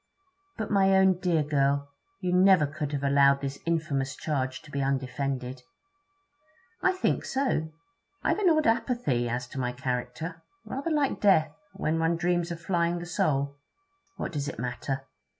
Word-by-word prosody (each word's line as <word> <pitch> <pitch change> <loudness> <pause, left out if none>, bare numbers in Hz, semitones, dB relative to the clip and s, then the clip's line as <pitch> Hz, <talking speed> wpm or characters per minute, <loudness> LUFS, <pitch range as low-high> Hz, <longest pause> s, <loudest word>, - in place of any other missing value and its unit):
'But, 215 -1 -4
my 195 -1 +4
own 190 -1 +4
dear 170 -4 +2
girl, 140 -1 +1 0.3
you 180 -1 0
never 185 -3 +6
could 150 0 -4
have 140 -1 -2
allowed 140 0 +5
this 140 0 -4
infamous 150 -5 0
charge 130 -4 -2
to 145 - -14
be 140 - -2
undefended?' 130 -1 -2 1.2
'I 380 - +3
think 375 - 0
so. 260 - 0 0.5
I've - - +1
an 390 -4 +4
odd 310 -2 +3
apathy 225 - +1
as 120 +2 -2
to 135 - -6
my 125 -1 0
character; 130 +6 -4 0.2
rather 275 +5 -3
like 295 -4 +1
death, 160 -7 +4 0.2
when 160 +1 -1
one 165 +1 +2
dreams 175 0 0
of 170 -1 -5
flying 170 0 0
the 175 - -5
soul. 145 -6 0 0.6
What - - -3
does 145 -3 -3
it - - -5
matter? 125 +3 -3
155 Hz, 160 wpm, -28 LUFS, 135-180 Hz, 1.2 s, never